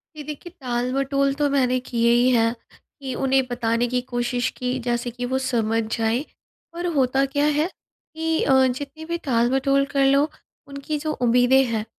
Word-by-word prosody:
जी 300 Hz, -, -7 dB
देखिए, 300 Hz, +4 st, -8 dB
टालमटोल 270 Hz, +3 st, 0 dB
तो 290 Hz, 0 st, +1 dB
मैंने 255 Hz, -2 st, +2 dB
किए 235 Hz, -1 st, +2 dB
ही 240 Hz, +1 st, +4 dB
हैं। 230 Hz, -1 st, +2 dB, 0.5 s
कि 265 Hz, -2 st, -4 dB
उन्हें 270 Hz, 0 st, +3 dB
बताने 240 Hz, -1 st, 0 dB
की 250 Hz, +1 st, 0 dB
कोशिश 245 Hz, 0 st, -1 dB
की 250 Hz, -, -4 dB
जैसे 240 Hz, 0 st, -2 dB
कि 245 Hz, +1 st, -5 dB
वो 260 Hz, -, +2 dB
समझ 225 Hz, -2 st, 0 dB
जाएँ 225 Hz, +3 st, 0 dB, 0.5 s
और 345 Hz, +1 st, -4 dB
होता 270 Hz, -1 st, +2 dB
क्या 285 Hz, +2 st, 0 dB
है 300 Hz, +1 st, +2 dB
कि 320 Hz, -3 st, -5 dB
अ, 270 Hz, -, +3 dB
जितनी 285 Hz, +5 st, -5 dB
भी 340 Hz, +1 st, -2 dB
टालमटोल 270 Hz, +2 st, +2 dB
कर 275 Hz, -1 st, +1 dB
लो 275 Hz, +1 st, +4 dB, 0.5 s
उनकी 280 Hz, +2 st, -4 dB
जो 310 Hz, +1 st, -3 dB
उम्मीदें 245 Hz, +2 st, +4 dB
हैं 220 Hz, -1 st, -2 dB
260 Hz, 170 wpm, -23 LUFS, 240-280 Hz, 0.5 s, ही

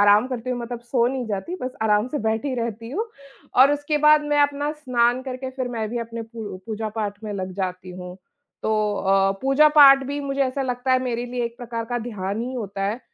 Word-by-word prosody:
आराम 205 Hz, +3 st, +6 dB
करती 255 Hz, -1 st, -4 dB
हूँ 250 Hz, -, -1 dB
मतलब 240 Hz, 0 st, -5 dB
सो 240 Hz, 0 st, +1 dB
नहीं 255 Hz, -1 st, -2 dB
जाती, 210 Hz, -, -3 dB
बस 255 Hz, -, -2 dB
आराम 210 Hz, +1 st, +3 dB
से 295 Hz, -, -2 dB
बैठी 225 Hz, +5 st, -1 dB
रहती 230 Hz, -1 st, -4 dB
हूँ 420 Hz, +10 st, -1 dB, 0.5 s
और 270 Hz, +3 st, +7 dB
उसके 290 Hz, +1 st, 0 dB
बाद 300 Hz, 0 st, +7 dB
मैं 295 Hz, -, +3 dB
अपना 285 Hz, +1 st, 0 dB
स्नान 250 Hz, -4 st, +1 dB
करके 260 Hz, 0 st, -5 dB
फिर 260 Hz, -1 st, -4 dB
मैं 225 Hz, -3 st, -3 dB
भी 240 Hz, -, -2 dB
अपने 230 Hz, 0 st, -5 dB
पू 225 Hz, -4 st, -7 dB
पूजा-पाठ 215 Hz, -2 st, -3 dB
में 210 Hz, -, -4 dB
लग 190 Hz, -2 st, -4 dB
जाती 185 Hz, -1 st, -4 dB
हूँ। 180 Hz, 0 st, -8 dB, 0.5 s
तो 220 Hz, -, 0 dB, 0.2 s
अ, 195 Hz, 0 st, +3 dB
पूजा-पाठ 275 Hz, 0 st, +7 dB
भी 285 Hz, +1 st, -3 dB
मुझे 275 Hz, 0 st, -3 dB
ऐसा 270 Hz, +1 st, -1 dB
लगता 250 Hz, 0 st, -1 dB
है 255 Hz, -, +5 dB
मेरे 245 Hz, -1 st, -2 dB
लिए 245 Hz, 0 st, -2 dB
एक 235 Hz, 0 st, -5 dB
प्रकार 230 Hz, -1 st, -5 dB
का 240 Hz, -, +1 dB
ध्यान 210 Hz, -3 st, -4 dB
ही 250 Hz, +2 st, -4 dB
होता 200 Hz, -5 st, -4 dB
है, 215 Hz, +5 st, -2 dB
240 Hz, 215 wpm, -23 LUFS, 215-265 Hz, 0.5 s, और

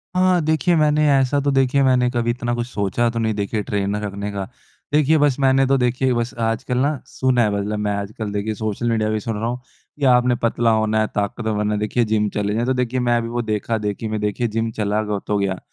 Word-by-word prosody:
हाँ। 185 Hz, -1 st, +3 dB
देखिए, 160 Hz, +3 st, +2 dB
मैंने 150 Hz, -1 st, +3 dB
ऐसा 135 Hz, +1 st, +2 dB
तो, 140 Hz, 0 st, 0 dB
देखिए, 135 Hz, 0 st, +2 dB
मैंने 125 Hz, -2 st, +3 dB
कभी 120 Hz, -1 st, -1 dB
इतना 120 Hz, 0 st, -3 dB
कुछ 120 Hz, 0 st, -3 dB
सोचा 110 Hz, +1 st, 0 dB
तो 115 Hz, 0 st, -3 dB
नहीं। 110 Hz, -1 st, 0 dB
देखिए, 105 Hz, +1 st, -2 dB
ट्रेनर 100 Hz, 0 st, -2 dB
रखने 100 Hz, 0 st, -4 dB
का। 100 Hz, -1 st, -4 dB, 0.5 s
देखिए, 150 Hz, +1 st, +4 dB
बस 145 Hz, -3 st, +3 dB
मैंने 135 Hz, 0 st, +4 dB
तो 135 Hz, +1 st, +3 dB
देखिए, 125 Hz, +1 st, +1 dB
बस 120 Hz, 0 st, -2 dB
आजकल 115 Hz, +2 st, -1 dB
ना 140 Hz, +2 st, +1 dB
सुना 130 Hz, -2 st, +1 dB
है। 105 Hz, -, +1 dB
मतलब, 105 Hz, +1 st, -2 dB
मैं 105 Hz, 0 st, -1 dB
आजकल 100 Hz, +1 st, -5 dB
देखिए, 105 Hz, +2 st, -2 dB
सोशल 110 Hz, +2 st, -2 dB
मीडिया 110 Hz, -1 st, 0 dB
भी 110 Hz, 0 st, 0 dB
सुन 115 Hz, +1 st, -4 dB
रहा 115 Hz, +2 st, -2 dB
हूँ 125 Hz, +1 st, -4 dB, 0.4 s
कि 140 Hz, -, +1 dB
आपने 125 Hz, 0 st, +3 dB
पतला 115 Hz, 0 st, +2 dB
होना 110 Hz, 0 st, +1 dB
है, 110 Hz, -, +1 dB
ताकतवर 105 Hz, +2 st, -2 dB
बनना 105 Hz, 0 st, 0 dB
है, 105 Hz, -, -1 dB
देखिए, 105 Hz, +3 st, 0 dB
जिम 105 Hz, -1 st, +1 dB
चले 105 Hz, 0 st, 0 dB
जाएँ। 115 Hz, +2 st, 0 dB
तो 130 Hz, -, +1 dB
देखिए, 125 Hz, 0 st, -1 dB
मैं 120 Hz, -1 st, +2 dB
भी 115 Hz, -, -4 dB
वो 120 Hz, +1 st, -2 dB
देखा-देखी 110 Hz, -1 st, -2 dB
में 110 Hz, 0 st, -2 dB
देखिए, 105 Hz, +3 st, -1 dB
जिम 115 Hz, +1 st, -2 dB
चला 105 Hz, 0 st, +1 dB
ग 105 Hz, -1 st, -2 dB
तो -, -, -1 dB
हो -, -, +2 dB
गया। 95 Hz, -2 st, -1 dB
115 Hz, 240 wpm, -21 LUFS, 105-130 Hz, 0.5 s, देखिए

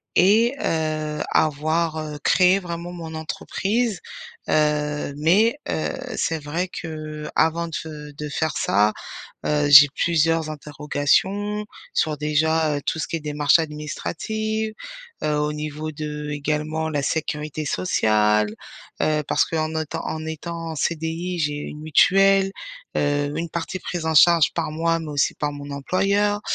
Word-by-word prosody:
et 220 Hz, +7 st, +5 dB
heu, 155 Hz, -1 st, -1 dB
avoir 155 Hz, +2 st, +1 dB
heu, 150 Hz, -1 st, -5 dB
créer 185 Hz, +1 st, +5 dB
vraiment 170 Hz, -1 st, -6 dB
mon 165 Hz, -2 st, -7 dB
entreprise. 200 Hz, +7 st, -2 dB, 0.5 s
Heu, 150 Hz, -1 st, +1 dB
mais, 200 Hz, -, +4 dB
heu, 155 Hz, -, -1 dB, 0.2 s
c'est 165 Hz, -, 0 dB
vrai 165 Hz, +5 st, -2 dB
qu'avant 160 Hz, +1 st, -2 dB
de -, -, -13 dB
f -, -, -4 dB
heu, 150 Hz, -1 st, -9 dB
de 150 Hz, +1 st, -6 dB
faire 155 Hz, +1 st, -1 dB
ça, 105 Hz, +2 st, +2 dB, 0.5 s
heu, 150 Hz, -1 st, +1 dB
j'ai 145 Hz, 0 st, +10 dB
plusieurs 165 Hz, -1 st, +2 dB
interrogations, 155 Hz, +8 st, 0 dB, 0.3 s
sur 155 Hz, -1 st, +1 dB
déjà, 155 Hz, +1 st, +1 dB
heu, -, -, -3 dB
tout -, -, -1 dB
ce -, -, -2 dB
qui -, -, -2 dB
est 165 Hz, -, -4 dB
démarches 150 Hz, +1 st, +3 dB
administratives, 215 Hz, +8 st, -3 dB, 0.5 s
heu, 150 Hz, -, +1 dB
au 150 Hz, 0 st, 0 dB
niveau 150 Hz, +1 st, -4 dB
de 150 Hz, 0 st, -5 dB
également 150 Hz, +2 st, -2 dB
la 145 Hz, -3 st, -1 dB
sécurité 150 Hz, 0 st, -2 dB
sociale. 105 Hz, -10 st, +2 dB, 0.5 s
Heu, 150 Hz, -1 st, +1 dB
parce -, -, +3 dB
qu'en 160 Hz, -1 st, -2 dB
autant 160 Hz, +1 st, -3 dB
en 155 Hz, 0 st, -4 dB
étant 165 Hz, +1 st, -5 dB
en 160 Hz, -, -6 dB
CDI, 165 Hz, +3 st, -2 dB
j'ai 150 Hz, -1 st, 0 dB
une 150 Hz, 0 st, -7 dB
mutuelle, 195 Hz, +5 st, +4 dB, 0.4 s
heu, 145 Hz, 0 st, +1 dB
une 165 Hz, 0 st, -3 dB
partie 170 Hz, +3 st, -4 dB
prise 170 Hz, -2 st, -4 dB
en 160 Hz, -, 0 dB
charge 170 Hz, +1 st, +6 dB
par 165 Hz, -2 st, -1 dB
moi, 165 Hz, +1 st, 0 dB
mais 160 Hz, -2 st, -6 dB
aussi 145 Hz, 0 st, +1 dB
par 150 Hz, -, -2 dB
mon 145 Hz, 0 st, -8 dB
employeur. 200 Hz, +8 st, +1 dB
155 Hz, 145 wpm, -23 LUFS, 150-170 Hz, 0.5 s, j'ai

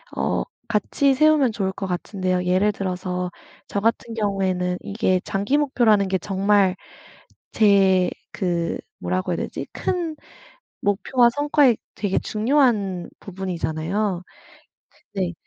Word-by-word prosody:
어 -, -, 0 dB, 0.2 s
같이 230 Hz, +5 st, +2 dB
세우면 300 Hz, -2 st, +4 dB
좋을 195 Hz, -3 st, -1 dB
것 195 Hz, +1 st, -5 dB
같은데요 185 Hz, 0 st, -1 dB
예를 185 Hz, +3 st, +2 dB
들어서 180 Hz, -2 st, -3 dB, 0.4 s
저 200 Hz, -, -2 dB
같은 230 Hz, +2 st, 0 dB
경우에는 190 Hz, -4 st, 0 dB
이게 200 Hz, -3 st, 0 dB
장기 205 Hz, +7 st, 0 dB
목표라는 235 Hz, -9 st, +3 dB
게 190 Hz, 0 st, +1 dB
정말 195 Hz, 0 st, +2 dB, 0.8 s
제 195 Hz, -4 st, +4 dB, 0.2 s
그 170 Hz, -3 st, -1 dB, 0.2 s
뭐라고 185 Hz, 0 st, -2 dB
해야 170 Hz, -, -1 dB
되지 -, -, -4 dB
큰 345 Hz, -4 st, -2 dB, 0.7 s
목표와 235 Hz, +5 st, +3 dB
성과에 290 Hz, -3 st, +3 dB, 0.2 s
되게 200 Hz, -2 st, 0 dB
중요한 215 Hz, -6 st, +1 dB
부분이잖아요. 185 Hz, 0 st, -2 dB, 0.9 s
네. 185 Hz, -3 st, -1 dB
200 Hz, 250 characters per minute, -23 LUFS, 185-230 Hz, 0.9 s, 세우면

